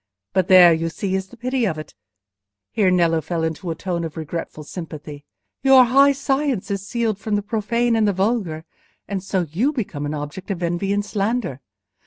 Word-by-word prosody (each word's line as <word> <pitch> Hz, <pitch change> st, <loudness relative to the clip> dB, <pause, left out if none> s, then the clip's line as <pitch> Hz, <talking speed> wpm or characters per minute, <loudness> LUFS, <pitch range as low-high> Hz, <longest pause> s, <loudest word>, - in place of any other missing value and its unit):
But 185 Hz, -2 st, +2 dB
there, 180 Hz, -2 st, +8 dB
you 165 Hz, +1 st, -1 dB
see, 190 Hz, +3 st, -3 dB
is 190 Hz, 0 st, -1 dB
the 245 Hz, -, -15 dB
pity 255 Hz, +1 st, -1 dB
of 160 Hz, -7 st, -1 dB
it,"—here 100 Hz, -, -5 dB
Nello 170 Hz, -3 st, +3 dB
fell 165 Hz, +2 st, -3 dB
into 160 Hz, +2 st, -3 dB
a 165 Hz, -, -2 dB
tone 175 Hz, -1 st, -3 dB
of 165 Hz, 0 st, -6 dB
regretful 160 Hz, -1 st, -5 dB
sympathy—"your 160 Hz, -, 0 dB
high 275 Hz, +4 st, +5 dB
science 275 Hz, -6 st, -1 dB
is 200 Hz, 0 st, -3 dB
sealed 225 Hz, -4 st, -1 dB
from 215 Hz, 0 st, -1 dB
the 205 Hz, -, -1 dB
profane 230 Hz, +2 st, 0 dB
and 220 Hz, -2 st, +3 dB
the -, -, +3 dB
vulgar, 190 Hz, -5 st, -1 dB, 0.4 s
and 195 Hz, -2 st, -3 dB
so 190 Hz, -1 st, 0 dB
you 175 Hz, -, 0 dB
become 180 Hz, -, -4 dB
an 150 Hz, -, -3 dB
object 150 Hz, +7 st, -7 dB
of 180 Hz, -3 st, -3 dB
envy 175 Hz, +3 st, -1 dB
and 205 Hz, 0 st, 0 dB
slander. 205 Hz, -, -2 dB
185 Hz, 185 wpm, -21 LUFS, 160-220 Hz, 0.4 s, there